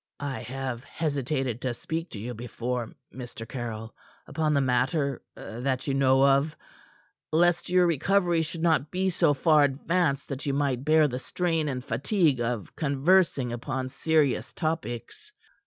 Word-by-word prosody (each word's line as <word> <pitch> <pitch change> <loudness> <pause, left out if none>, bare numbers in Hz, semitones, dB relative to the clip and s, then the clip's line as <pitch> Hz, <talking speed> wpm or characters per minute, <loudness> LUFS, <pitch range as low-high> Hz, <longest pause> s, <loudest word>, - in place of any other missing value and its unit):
"I 140 -2 -3
have 130 0 -5
hesitated 135 -6 -2
to 125 -2 -2
speak 165 +6 -4
to 105 - -8
you 120 +4 -5
before, 120 +1 -4 0.2
Mr. 120 -2 -8
Caryll, 115 -2 -5 0.3
upon 155 -2 0
the - - +4
matter 135 +2 +1
that 130 +3 -3
you 140 - 0
know 135 0 +4
of, 140 +3 +3 0.8
lest 175 +2 +2
your 180 0 +4
recovery 175 +1 +2
should 160 +1 -5
not 160 -3 +2
be 185 +1 0
so 165 -4 +3
far 150 +2 +4
advanced 145 +1 0
that 135 +1 -5
you 140 - +1
might 135 -3 0
bear 155 0 +5
the 125 -2 -4
strain 165 0 -1
and 130 -1 -4
fatigue 140 - +1
of 115 -3 -3
conversing 140 -3 +2
upon 130 +2 -3
serious 150 0 +1
topics. 160 - -4
140 Hz, 150 wpm, -27 LUFS, 125-160 Hz, 0.8 s, bear